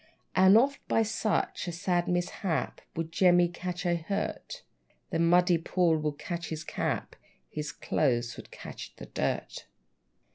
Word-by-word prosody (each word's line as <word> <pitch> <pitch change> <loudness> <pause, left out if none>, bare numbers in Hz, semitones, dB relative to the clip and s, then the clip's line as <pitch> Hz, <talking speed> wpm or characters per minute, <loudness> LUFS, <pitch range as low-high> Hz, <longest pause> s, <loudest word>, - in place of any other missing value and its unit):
And 190 +3 +7
oft, 275 +4 +3
by 225 - +3
such 215 -3 -1
a - - -1
sad 175 0 0
mishap, 175 -1 -1
Would 165 0 -3
Jemmy 175 0 +5
catch 180 +1 -5
a 175 -1 +2
hurt; 200 - -4 0.5
The 165 - 0
muddy 175 +1 +4
pool 170 0 +2
would 150 -1 -2
catch 170 +1 -4
his 155 -1 -4
cap, - - -2 0.4
His 150 -1 -4
clothes 120 -5 0
would - - -11
catch - - -9
the - - -9
dirt! - - -3
175 Hz, 145 wpm, -29 LUFS, 165-185 Hz, 0.5 s, And